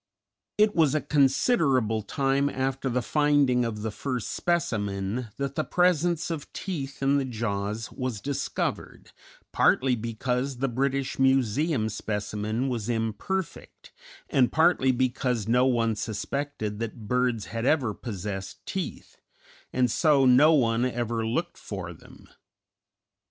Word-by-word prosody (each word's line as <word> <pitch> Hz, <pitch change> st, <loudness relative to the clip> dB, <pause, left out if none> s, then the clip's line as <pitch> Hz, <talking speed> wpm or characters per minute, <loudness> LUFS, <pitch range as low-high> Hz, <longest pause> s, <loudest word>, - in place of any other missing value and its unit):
It 210 Hz, 0 st, +3 dB
was 155 Hz, -3 st, +3 dB
a 155 Hz, -, +1 dB
considerable 135 Hz, -, +2 dB
time 135 Hz, +6 st, 0 dB
after 135 Hz, 0 st, -2 dB
the 125 Hz, 0 st, 0 dB
finding 145 Hz, -3 st, +3 dB
of 110 Hz, -3 st, -3 dB
the 110 Hz, -, -2 dB
first 125 Hz, +3 st, -4 dB
specimen 110 Hz, -, -1 dB
that 140 Hz, -1 st, -2 dB
the 155 Hz, -, -1 dB
presence 175 Hz, -1 st, +1 dB
of 155 Hz, -4 st, -5 dB
teeth 140 Hz, -8 st, -5 dB
in 140 Hz, +1 st, +3 dB
the 135 Hz, -, -1 dB
jaws 110 Hz, -2 st, -3 dB
was 125 Hz, -5 st, -4 dB
discovered, 140 Hz, +3 st, -3 dB, 0.4 s
partly 130 Hz, -1 st, +3 dB
because 125 Hz, +4 st, -2 dB
the 135 Hz, +2 st, 0 dB
British 135 Hz, +2 st, -1 dB
Museum 135 Hz, 0 st, +2 dB
specimen 110 Hz, +3 st, -3 dB
was 120 Hz, -3 st, -3 dB
imperfect, 115 Hz, -, -3 dB, 0.4 s
and 130 Hz, -4 st, +3 dB
partly 160 Hz, -5 st, +4 dB
because 125 Hz, -3 st, 0 dB
no 125 Hz, +3 st, +4 dB
one 115 Hz, -3 st, +1 dB
suspected 110 Hz, +1 st, -4 dB
that 115 Hz, -1 st, -5 dB
birds 125 Hz, -4 st, +1 dB
had 115 Hz, +2 st, -1 dB
ever 130 Hz, -9 st, +2 dB
possessed 100 Hz, -3 st, -6 dB
teeth, -, -, -5 dB, 0.5 s
and 125 Hz, -2 st, +1 dB
so 145 Hz, -3 st, +4 dB
no 130 Hz, +5 st, +6 dB
one 120 Hz, -6 st, +3 dB
ever 120 Hz, -2 st, -1 dB
looked 165 Hz, +10 st, -2 dB
for 95 Hz, -4 st, -6 dB
them. 80 Hz, -, -17 dB
125 Hz, 130 wpm, -27 LUFS, 110-140 Hz, 0.5 s, no